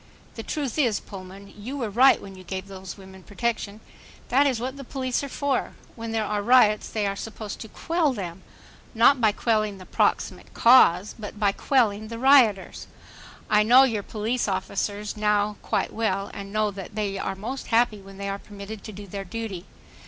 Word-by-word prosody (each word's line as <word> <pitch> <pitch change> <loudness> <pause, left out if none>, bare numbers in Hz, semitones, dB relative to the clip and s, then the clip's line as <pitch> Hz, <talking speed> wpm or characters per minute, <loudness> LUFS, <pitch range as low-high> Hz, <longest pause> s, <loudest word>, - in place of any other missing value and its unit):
The 225 - -6
truth 285 +3 -3
is, 235 -8 +2
Pullman, 195 +1 -11
you 245 +7 -6
were 230 -6 -3
right 255 +6 +6
when 195 - -10
you 185 -1 -12
gave 190 +1 -5
these 190 -1 -9
women 190 -1 -13
protection. 215 +1 -3 0.5
That 280 +3 +4
is 255 -4 0
what 260 +3 -4
the 280 - -8
police 255 0 -2
are 280 - -5
for. 280 -1 -1 0.2
When 230 -1 -6
there 220 -1 0
are 210 0 -1
riots 215 -2 +4
they 215 -2 -1
are 200 0 -1
supposed 215 0 -7
to 220 - -7
quell 325 +5 0
them, 190 -6 -6 0.5
not 245 +3 +5
by 220 -2 +5
quelling 215 -2 0
the 185 - -12
"proximate - - -1
cause," 210 -6 +6
but 210 0 -8
by 205 -2 +3
quelling 215 -3 +1
the 230 +1 -6
rioters. 245 -6 +4 0.6
I 210 -1 +4
know 245 +5 +7
your 225 -6 +1
police 220 +4 -2
officers 200 +2 -2
now 210 -1 +1
quite - - -1
well 200 -3 -1
and 200 0 -7
know 215 0 +1
that 195 0 -9
they 200 -2 -2
are 195 - -3
most 235 +8 -6
happy 225 -3 +2
when 195 0 -13
they 200 0 -5
are 200 0 -3
permitted 205 +1 -9
to 215 - -7
do 205 0 -9
their 195 +1 -6
duty. 200 -3 -6
210 Hz, 190 wpm, -25 LUFS, 200-235 Hz, 0.6 s, know